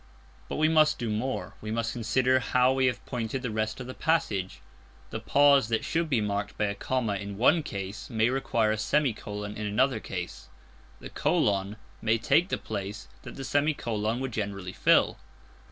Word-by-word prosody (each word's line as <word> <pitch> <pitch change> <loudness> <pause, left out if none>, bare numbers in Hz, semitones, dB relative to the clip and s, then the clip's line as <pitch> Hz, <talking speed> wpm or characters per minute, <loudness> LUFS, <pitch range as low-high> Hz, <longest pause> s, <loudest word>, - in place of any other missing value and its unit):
But - - -3
we 155 +1 +3
must 155 -1 +4
do 115 -3 -2
more. 105 -4 -3
We 110 - -6
must 115 +1 -1
consider 125 +3 +2
how 125 +1 +3
we 130 -1 +2
have 125 - -2
pointed 125 +1 -3
the 125 - -2
rest 110 +1 -2
of 125 - -6
the 130 - -7
passage. 110 - 0 0.5
The - - -3
pause 140 -4 +4
that 115 -1 -1
should 165 -1 0
be 130 -6 +2
marked 100 -1 -2
by 105 - +1
a 100 - -1
comma 110 0 -1
in 100 0 -6
one 150 +9 +4
case, 100 -7 -6
may 115 0 +2
require 115 -4 +1
a 110 - -1
semicolon 105 -6 -1
in 105 0 -3
another 120 +3 +2
case; 90 -4 -6 0.5
the - - -9
colon 100 0 +1 0.3
may 110 +1 +2
take 165 - +2
the - - 0
place 100 -1 -6
that - - -9
the 135 - -6
semicolon 120 -6 0
would 135 -1 -3
generally 100 -4 -4
fill. - - +3
115 Hz, 185 wpm, -28 LUFS, 105-130 Hz, 0.5 s, must